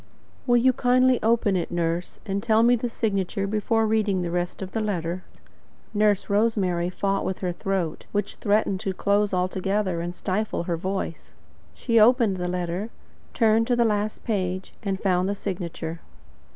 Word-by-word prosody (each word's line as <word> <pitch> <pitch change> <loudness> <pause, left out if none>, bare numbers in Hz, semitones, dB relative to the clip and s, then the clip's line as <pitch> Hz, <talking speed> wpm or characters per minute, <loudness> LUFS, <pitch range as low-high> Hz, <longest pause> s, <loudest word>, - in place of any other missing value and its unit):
"Will 240 0 +5
you 255 +2 +4
kindly 255 0 +3
open 225 -3 +2
it, 175 - -1
nurse, 170 0 -2
and 200 -1 -2
tell 220 0 +3
me 240 +1 +5
the 240 +1 -2
signature 200 -3 -1
before 215 +2 +1
reading 210 -4 +1
the 170 - -3
rest 175 +2 -2
of 190 - -7
the 225 - -2
letter." 185 -4 -2 0.7
Nurse 210 -2 +2
Rosemary 200 -5 +1
fought 195 +2 -1
with 190 - -2
her 180 -2 -2
throat, 175 -2 -3
which 205 -1 -2
threatened 205 -2 +1
to 190 -1 -3
close 205 +1 +1
altogether 185 0 0
and 175 +1 -4
stifle 200 -1 -2
her 170 -1 -1
voice. 185 -1 -4 0.4
She 230 -2 +2
opened 225 -3 +4
the 180 0 -2
letter, 180 +4 -2 0.5
turned 225 0 +3
to 245 - +2
the 240 -1 +3
last 210 -1 -1
page, 185 -4 -2
and 195 -3 -2
found 185 -1 +1
the 200 - -1
signature. 170 -4 -5
200 Hz, 165 wpm, -25 LUFS, 180-220 Hz, 0.7 s, Will